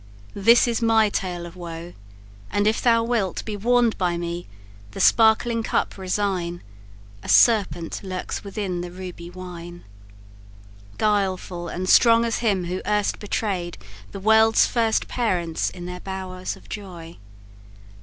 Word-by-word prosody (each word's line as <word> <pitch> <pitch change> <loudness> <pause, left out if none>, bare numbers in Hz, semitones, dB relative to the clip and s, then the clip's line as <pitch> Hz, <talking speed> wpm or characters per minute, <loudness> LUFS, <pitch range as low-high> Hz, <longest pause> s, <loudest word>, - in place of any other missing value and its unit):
This 230 +5 +5
is 235 0 -1
my 225 -2 +4
tale 180 -3 -3
of 170 - -11
woe; 170 -1 -8 0.6
and 205 +1 0
if 215 +1 +2
thou 230 -2 +4
wilt 230 -6 -1
Be 215 - -4
warn'd 240 +2 +2
by 175 -2 0
me, 170 0 -5 0.5
the - - -7
sparkling 230 +1 +4
cup - - -1
resign; 185 -2 -2 0.6
A - - -9
serpent 200 -7 +3
lurks 185 -2 -5
within 195 -3 -4
the 175 - -6
ruby 180 -1 -8
wine, 175 -1 -9 1.1
Guileful 190 -4 -1
and 185 +1 -4
strong 230 +3 +6
as 230 - -1
him 200 -6 0
who 180 +2 -3
erst 210 +1 0
betray'd 195 -4 -3 0.3
The - - -7
world's 220 +2 +5
first 225 -2 0
parents 175 -9 -1
in 175 -1 -9
their 180 0 -6
bowers 185 -1 -5
of - - -18
joy. 175 -5 -9
190 Hz, 140 wpm, -23 LUFS, 175-220 Hz, 1.1 s, strong